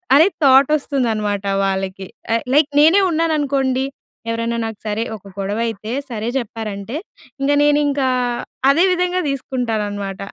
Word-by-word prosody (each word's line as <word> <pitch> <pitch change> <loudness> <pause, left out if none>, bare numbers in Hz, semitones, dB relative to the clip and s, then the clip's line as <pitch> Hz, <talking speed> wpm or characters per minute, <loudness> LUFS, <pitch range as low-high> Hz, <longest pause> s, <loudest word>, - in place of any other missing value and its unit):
అనే 320 +6 +7 0.2
థాట్ 270 +1 +6
వస్తుందనమాట 220 -9 -1 0.2
వాళ్ళకి. 190 -1 -2 0.3
ఆహ్, 230 - -1
లైక్ 295 +1 +4
నేనే 330 +7 +6
ఉన్నాననుకోండి. 280 -5 +1 0.4
ఎవరైనా 230 +1 -1
నాకు 220 -2 -6
సరే 210 +2 -1
ఒక 200 0 -15
గొడవ 200 +3 -2
అయితే 220 0 -5 0.2
'సరే' 225 0 -3
చెప్పారంటే 220 0 -6 0.5
ఇంక 280 +1 +2
నేనింక 290 -1 +2 0.7
అదే 330 +6 +3
విధంగా 360 0 0
తీసుకుంటాననమాట. 215 -7 -3
235 Hz, 120 wpm, -19 LUFS, 210-285 Hz, 0.7 s, అనే